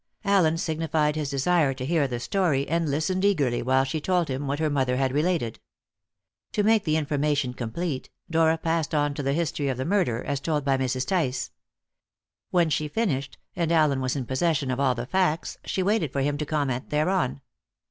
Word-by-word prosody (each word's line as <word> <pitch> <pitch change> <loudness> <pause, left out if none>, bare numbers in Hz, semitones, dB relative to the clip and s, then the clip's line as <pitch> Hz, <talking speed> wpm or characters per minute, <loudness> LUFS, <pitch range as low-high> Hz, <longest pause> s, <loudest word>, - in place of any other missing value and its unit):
Allen 180 -5 +3
signified 160 -3 0
his 150 -3 -2
desire 140 0 +2
to 130 -1 -5
hear 155 -1 +2
the 120 -2 -4
story, 150 -2 0
and 165 -1 0
listened 170 +6 0
eagerly 145 -12 +2
while 130 +2 +3
she 140 +4 -3
told 180 -1 +1
him 135 +2 -3
what 140 +1 -1
her 155 0 0
mother 130 -4 +1
had 135 -1 +1
related. 150 -6 0 0.9
To 210 - +1
make 220 0 +3
the 155 -1 +2
information 145 -3 0
complete, 130 +5 -4 0.2
Dora 165 0 +3
passed 160 -1 -1
on 145 -1 +1
to 145 - -4
the 135 0 0
history 160 -2 -1
of 130 -2 -1
the 130 - -2
murder, 170 - +1
as 140 -1 -2
told 150 0 -1
by 135 -1 +3
Mrs. 130 0 -1
Tice. 130 -9 -1 1.0
When 170 -3 +2
she 150 +2 0
finished, 145 - -2 0.2
and 170 -2 0
Allen 150 -5 +3
was 130 +1 -1
in 135 -3 -3
possession 140 +1 0
of 130 - -2
all 130 -2 +2
the 120 +1 -4
facts, 170 +1 0
she 190 - -1
waited 190 - +1
for 140 - -1
him 145 +1 0
to 150 - -3
comment 140 -5 -1
thereon. 150 -3 0
150 Hz, 195 wpm, -26 LUFS, 135-165 Hz, 1.0 s, Allen